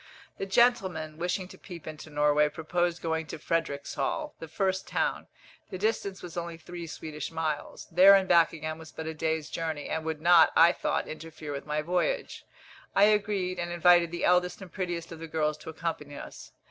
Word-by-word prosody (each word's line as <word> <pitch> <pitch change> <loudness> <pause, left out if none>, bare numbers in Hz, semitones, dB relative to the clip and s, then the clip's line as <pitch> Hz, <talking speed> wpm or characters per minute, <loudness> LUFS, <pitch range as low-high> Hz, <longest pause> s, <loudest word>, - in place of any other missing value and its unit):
The 195 - -3
gentlemen, 190 -8 +2
wishing 180 +2 -1
to - - -13
peep 175 -4 -10
into 155 0 -8
Norway, 150 0 +3
proposed 175 +2 -1
going 160 -1 -1
to - - -6
Fredericshall, 165 - -2
the 165 - -7
first 190 +3 -1
town - - -1 0.4
the 185 - -5
distance 200 -1 -1
was 175 - -8
only 170 -1 -4
three 170 +1 -8
Swedish 150 -1 -6
miles. 160 -2 -3
There 190 +4 +8
and 190 -1 +2
back 170 -2 +5
again 155 0 -5
was 160 -1 -11
but 160 - -7
a 160 - -3
day's 160 0 -1
journey, 160 -3 -4
and 160 - -2
would 160 -1 -3
not, 170 0 +6
I 165 +1 +7
thought, - - -1
interfere 155 -1 -8
with 140 +1 -6
my 150 0 -1
voyage. 180 - -1 0.5
I 200 - +6
agreed, 200 -3 +2
and 175 0 -3
invited 175 0 +5
the 175 +1 -2
eldest 180 0 +3
and 190 -3 -10
prettiest 175 -3 -3
of 165 - -8
the 165 - -7
girls 155 -1 0
to 155 - -9
accompany 160 -3 -4
us. - - -10
165 Hz, 190 wpm, -28 LUFS, 155-180 Hz, 0.5 s, There